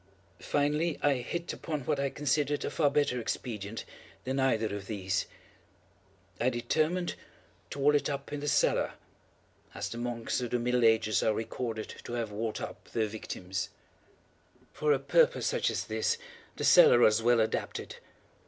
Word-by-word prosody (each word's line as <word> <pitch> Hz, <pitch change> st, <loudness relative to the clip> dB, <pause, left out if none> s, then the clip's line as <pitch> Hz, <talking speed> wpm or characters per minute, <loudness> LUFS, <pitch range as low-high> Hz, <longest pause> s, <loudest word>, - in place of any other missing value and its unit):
Finally 150 Hz, +3 st, 0 dB
I 145 Hz, -, +5 dB
hit 170 Hz, +8 st, -4 dB
upon 155 Hz, -3 st, -4 dB
what 140 Hz, +2 st, -1 dB
I 140 Hz, 0 st, +1 dB
considered 145 Hz, +1 st, 0 dB
a -, -, -3 dB
far 150 Hz, -3 st, +3 dB
better 140 Hz, -3 st, +1 dB
expedient 110 Hz, -2 st, -4 dB, 0.4 s
than 130 Hz, +1 st, -2 dB
either 115 Hz, -5 st, +1 dB
of 100 Hz, -1 st, -7 dB
these. 95 Hz, -4 st, -1 dB, 1.1 s
I 120 Hz, -, +3 dB
determined 155 Hz, +8 st, 0 dB, 0.6 s
to -, -, -7 dB
wall 145 Hz, +1 st, +4 dB
it 145 Hz, +1 st, +2 dB
up 140 Hz, 0 st, -5 dB
in 145 Hz, -, -2 dB
the 145 Hz, -, -4 dB
cellar—as 100 Hz, -7 st, -2 dB
the 115 Hz, -, -6 dB
monks 120 Hz, 0 st, -2 dB
of 120 Hz, -, -3 dB
the 125 Hz, -, +1 dB
middle 125 Hz, 0 st, +1 dB
ages 110 Hz, -1 st, +3 dB
are 110 Hz, -, +2 dB
recorded 110 Hz, 0 st, -4 dB
to -, -, -7 dB
have 115 Hz, -3 st, -2 dB
walled 110 Hz, +1 st, -3 dB
up -, -, -7 dB
their 110 Hz, -, +2 dB
victims. 95 Hz, -4 st, -5 dB, 1.0 s
For 150 Hz, 0 st, +1 dB
a 145 Hz, -, +5 dB
purpose 475 Hz, -, +3 dB
such -, -, +1 dB
as -, -, -2 dB
this 465 Hz, -, 0 dB, 0.4 s
the -, -, -5 dB
cellar -, -, +8 dB
was 110 Hz, +1 st, +5 dB
well 120 Hz, +1 st, +4 dB
adapted. 110 Hz, -, -2 dB
125 Hz, 160 wpm, -30 LUFS, 110-145 Hz, 1.1 s, cellar